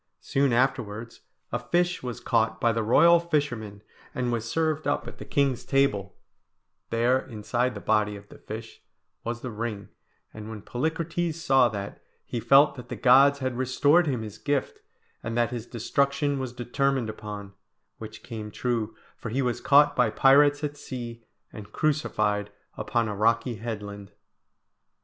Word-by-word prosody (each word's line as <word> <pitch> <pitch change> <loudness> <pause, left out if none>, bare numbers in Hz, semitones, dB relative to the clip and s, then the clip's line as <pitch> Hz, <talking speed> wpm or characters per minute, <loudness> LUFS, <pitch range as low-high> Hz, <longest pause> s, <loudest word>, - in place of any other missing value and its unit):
Soon 135 -1 +1
afterwards 115 -2 -1 0.3
a 120 - -1
fish 175 +8 0
was 125 -2 -5
caught 115 -3 +1
by 115 - +3
the 115 0 -1
royal 165 +10 +6
fisherman, 120 -11 -2 0.3
and 125 -2 -1
was 115 -1 -2
served 155 -1 0
up 145 - -1
at - - -10
the - - -8
king's 140 -4 0
table 105 -9 0 0.7
there, 120 +3 +2
inside 120 +2 -2
the - - -5
body 105 0 +1
of 100 0 -12
the - - -14
fish, 110 +1 -9 0.4
was 120 +1 -4
the 125 - -5
ring; 105 -2 -5 0.4
and 110 0 -8
when 110 -2 -8
Polycrates 160 +4 -2
saw 135 -6 +3
that, 100 -2 -6 0.2
he 120 - -4
felt 135 +6 +5
that 125 -2 -11
the - - -4
gods 135 +2 +6
had 130 -2 -3
restored 145 +6 +3
him 125 -6 -1
his 105 -2 -9
gift, 145 -2 -2 0.4
and 115 +1 -4
that 120 -1 +2
his 120 -2 -5
destruction 140 +4 0
was 130 -2 -4
determined 125 +1 -1
upon; 105 -2 -7 0.5
which 110 0 -9
came 110 -3 -7
true, 115 -1 -2 0.2
for - - -7
he 130 +5 0
was 125 -2 -1
caught 145 +1 +5
by 125 -3 +3
pirates 145 +5 +4
at 145 0 -3
sea, 120 -4 -7 0.3
and 105 -1 -10
crucified 105 -10 0 0.3
upon 115 -1 -1
a 105 - -3
rocky 115 +3 +1
headland. 105 -2 -6
120 Hz, 160 wpm, -26 LUFS, 110-140 Hz, 0.7 s, royal